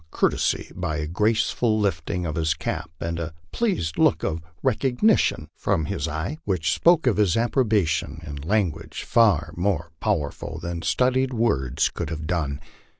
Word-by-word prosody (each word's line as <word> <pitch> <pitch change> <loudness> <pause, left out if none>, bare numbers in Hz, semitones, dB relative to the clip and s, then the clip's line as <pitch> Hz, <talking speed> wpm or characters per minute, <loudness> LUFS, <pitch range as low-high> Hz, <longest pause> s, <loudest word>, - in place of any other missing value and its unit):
courtesy - - 0
by 80 -1 -2
a 75 - -2
graceful 110 +5 +1
lifting 90 -2 -1
of 80 - -2
his 80 0 0
cap - - -4
and 85 0 -3
a 80 -1 -5 0.2
pleased 180 - -1
look - - +3
of 80 +1 -1 0.2
recognition 130 - +2
from 80 - 0
his - - -2
eye, 80 - -3
which 90 -5 0
spoke 170 -3 +4
his 105 -7 +3
approbation 105 - +1
in 75 -2 -6
language 90 +3 -1
far 105 -10 +3
more 85 -3 -1
powerful 70 0 -2
than 85 0 -4
studied 130 +11 +1
words 70 - +1
could 85 - -4
have 80 -1 -5
done. 75 -4 -1
85 Hz, 150 wpm, -24 LUFS, 80-115 Hz, 0.2 s, spoke